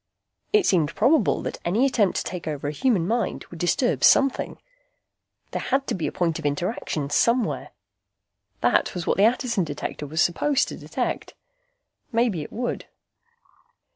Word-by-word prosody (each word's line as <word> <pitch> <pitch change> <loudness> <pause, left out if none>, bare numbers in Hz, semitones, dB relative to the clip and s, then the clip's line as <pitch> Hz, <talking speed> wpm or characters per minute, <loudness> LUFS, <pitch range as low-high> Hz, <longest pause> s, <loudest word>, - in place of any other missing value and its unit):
It 420 -3 +4
seemed 165 - +2
probable 240 +3 +3
that - - -5
any 210 +10 +2
attempt 220 -8 +2
to - - -1
take 180 -3 -6
over 145 -2 -3
a - - -1
human 190 - +1
mind 235 +2 -1
would 170 - -9
disturb 175 +9 +1
something. 275 -1 +4 0.9
There - - -3
had 270 +1 0
to - - -2
be 175 - -2
a - - -3
point 165 -2 -1
of 160 - -8
interaction, 145 -2 -2
somewhere. 235 +8 +1 0.9
That 120 +8 +2
was 175 -2 -3
what - - +1
the 200 - +5
Attison 240 -6 -1
Detector 145 -1 -5
was 160 +3 -4
supposed 275 +12 +2
to - - -6
detect. - - -4 0.8
Maybe 230 -8 +1
it 150 - -8
would. 245 +2 -3
190 Hz, 160 wpm, -24 LUFS, 160-245 Hz, 0.9 s, the